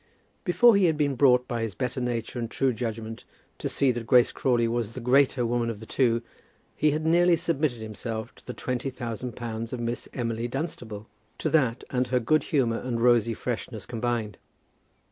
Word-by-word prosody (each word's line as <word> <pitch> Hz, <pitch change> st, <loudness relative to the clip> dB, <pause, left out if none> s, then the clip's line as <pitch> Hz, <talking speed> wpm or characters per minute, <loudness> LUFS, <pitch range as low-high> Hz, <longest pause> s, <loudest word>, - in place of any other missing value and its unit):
Before 230 Hz, +5 st, +6 dB
he 200 Hz, -2 st, +4 dB
had 160 Hz, -3 st, +2 dB
been 145 Hz, -2 st, +1 dB
brought 125 Hz, -1 st, +4 dB
by 120 Hz, -1 st, -2 dB
his 110 Hz, -5 st, -3 dB
better 125 Hz, +3 st, -2 dB
nature 120 Hz, 0 st, -2 dB
and 115 Hz, -1 st, -3 dB
true 130 Hz, +1 st, +1 dB
judgment 115 Hz, -1 st, -5 dB, 0.4 s
to -, -, -2 dB
see 135 Hz, -2 st, +2 dB
that 120 Hz, -2 st, -5 dB
Grace 125 Hz, +1 st, +5 dB
Crawley 120 Hz, -3 st, +1 dB
was 115 Hz, -1 st, -2 dB
the 130 Hz, -, -6 dB
greater 130 Hz, 0 st, +3 dB
woman 120 Hz, 0 st, 0 dB
of 110 Hz, -3 st, -5 dB
the 110 Hz, -, -9 dB
two, 115 Hz, -1 st, +1 dB, 0.5 s
he 155 Hz, -, +3 dB
had 155 Hz, +2 st, -1 dB
nearly 175 Hz, +2 st, +5 dB
submitted 155 Hz, -7 st, -1 dB
himself 110 Hz, +1 st, -5 dB
to -, -, -21 dB
the -, -, -4 dB
twenty 125 Hz, +1 st, -2 dB
thousand 120 Hz, -2 st, -5 dB
pounds 115 Hz, -1 st, -5 dB
of 125 Hz, -, -3 dB
Miss 120 Hz, 0 st, -3 dB
Emily 115 Hz, -1 st, -2 dB
Dunstable, 120 Hz, -6 st, -5 dB, 0.3 s
to -, -, -2 dB
that, 130 Hz, -7 st, +2 dB
and 125 Hz, -1 st, +1 dB
her 125 Hz, +1 st, +2 dB
good 155 Hz, +7 st, +2 dB
humour 120 Hz, -6 st, +1 dB
and 120 Hz, -2 st, -3 dB
rosy 115 Hz, -1 st, +3 dB
freshness -, -, -4 dB
combined. 115 Hz, -2 st, -2 dB
120 Hz, 190 wpm, -27 LUFS, 115-135 Hz, 0.5 s, Before